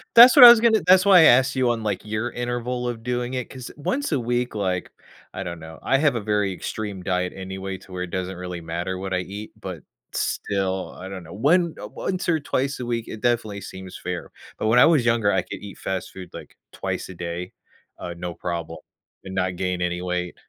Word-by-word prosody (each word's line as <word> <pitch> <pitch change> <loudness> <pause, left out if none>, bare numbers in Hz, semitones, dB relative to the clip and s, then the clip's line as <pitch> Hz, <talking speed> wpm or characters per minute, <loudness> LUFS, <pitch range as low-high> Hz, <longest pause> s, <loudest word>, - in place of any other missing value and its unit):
That's 240 +2 +10
what 280 - +11
I - - +14
was 235 -2 +7
gonna 225 -2 +4
That's 185 +1 +6
why 190 -3 +8
I - - +7
asked 130 0 +5
you 130 -2 +2
on, 115 -1 -1
like, 105 -3 -2
your 110 +3 -2
interval 120 0 -3
of 115 -2 -5
doing 125 +1 -2
it, 125 -3 -3
'cause 130 -2 -9
once 260 - -2
a 145 - +2
week, 120 0 -1
like 95 -3 -2 0.4
I 95 - -5
don't 85 -2 -6
know. 80 0 -10
I 135 - +2
have 145 -3 +2
a - - -1
very 105 -2 0
extreme 100 +1 -5
diet 90 0 -1
anyway, 95 0 -6
to 95 - -16
where 90 0 -4
it 90 - -5
doesn't 95 0 -3
really 90 -1 -6
matter 85 +3 -4
what 95 0 -4
I 90 - +1
eat, 100 +4 -7
but - - -7 0.3
still 95 -2 -2
I 95 - -7
don't 95 -1 -7
know. 85 0 -12
One, 165 - +2
uh - - -6
Once, 185 - -4
or 160 -2 +2
twice, 135 -1 -2
a 125 - -4
week, 115 -1 -2
it 110 - -8
definitely 115 -4 0
seems 95 -1 -9
fair. 90 0 -5 0.3
But - - -2
when 115 +3 +5
I - - +8
was 155 -7 +4
younger, 115 -3 +3
I 95 -2 +2
could - - -8
eat 100 -2 -10
fast 95 -2 -4
food, 90 -2 -10
like, - - -10 0.2
twice - - -4
a 90 - -9
day, 90 +1 -5 0.5
uh, 85 - -6
no 90 -1 -5
problem, 85 -2 -5 0.5
and 95 - -7
not 90 -1 0
gain 90 0 -2
any 90 0 -1
weight. 90 -1 -2
100 Hz, 230 wpm, -23 LUFS, 90-125 Hz, 0.5 s, I